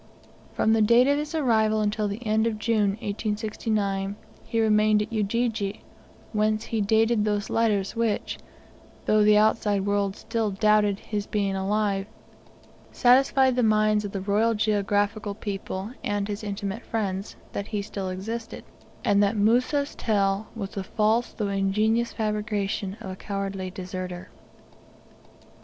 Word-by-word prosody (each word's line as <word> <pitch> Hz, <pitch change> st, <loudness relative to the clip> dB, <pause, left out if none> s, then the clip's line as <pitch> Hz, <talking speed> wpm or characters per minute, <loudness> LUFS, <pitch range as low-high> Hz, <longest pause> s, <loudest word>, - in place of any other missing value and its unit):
From 220 Hz, -, +2 dB
the 225 Hz, -, +3 dB
date 235 Hz, +4 st, +5 dB
of 285 Hz, +1 st, +3 dB
his 300 Hz, +2 st, -4 dB
arrival 220 Hz, -7 st, +2 dB
until 210 Hz, 0 st, 0 dB
the 205 Hz, +5 st, -5 dB
end 220 Hz, +1 st, +2 dB
of 220 Hz, -2 st, -2 dB
June, 215 Hz, -2 st, +1 dB
1869, 205 Hz, -1 st, -2 dB, 0.3 s
he 230 Hz, -, -1 dB
remained 215 Hz, -1 st, +4 dB
at 215 Hz, -, -9 dB
Ujiji, 215 Hz, -1 st, -1 dB, 0.5 s
whence 215 Hz, 0 st, +1 dB
he 225 Hz, -2 st, -1 dB
dated 220 Hz, +2 st, +3 dB
those 210 Hz, -1 st, -1 dB
letters 210 Hz, -4 st, +1 dB
which, 230 Hz, -2 st, -1 dB, 0.7 s
though 215 Hz, 0 st, +4 dB
the 210 Hz, 0 st, +6 dB
outside 210 Hz, -2 st, +2 dB
world 200 Hz, -1 st, 0 dB
still 225 Hz, -2 st, -2 dB
doubted 210 Hz, 0 st, +3 dB
his 205 Hz, -2 st, -4 dB
being 200 Hz, -2 st, -1 dB
alive, 195 Hz, 0 st, 0 dB, 0.8 s
satisfied 260 Hz, +1 st, +4 dB
the 250 Hz, -, +2 dB
minds 215 Hz, -1 st, +3 dB
of 205 Hz, -, -5 dB
the 195 Hz, -, -4 dB
Royal 210 Hz, +4 st, +2 dB
Geographical 205 Hz, 0 st, 0 dB
people, 200 Hz, 0 st, -5 dB
and 205 Hz, -1 st, -1 dB
his 210 Hz, 0 st, -5 dB
intimate 200 Hz, +1 st, -4 dB
friends, 200 Hz, -3 st, -3 dB, 0.2 s
that 200 Hz, -, -4 dB
he 210 Hz, -2 st, -3 dB
still 195 Hz, -2 st, -5 dB
existed, 225 Hz, +5 st, -5 dB, 0.4 s
and 205 Hz, -1 st, +4 dB
that 205 Hz, +2 st, +2 dB
Musa'a 250 Hz, +7 st, +2 dB
tale 200 Hz, -1 st, +1 dB
was 200 Hz, -4 st, -5 dB
the 195 Hz, -, -4 dB
false 220 Hz, +4 st, +1 dB
though 210 Hz, -, -3 dB
ingenious 215 Hz, +4 st, +1 dB
fabrication 210 Hz, -2 st, -2 dB
of 190 Hz, -, -6 dB
a -, -, -6 dB
cowardly 195 Hz, -1 st, -4 dB
deserter. 185 Hz, -1 st, -6 dB
210 Hz, 145 wpm, -26 LUFS, 200-220 Hz, 0.8 s, the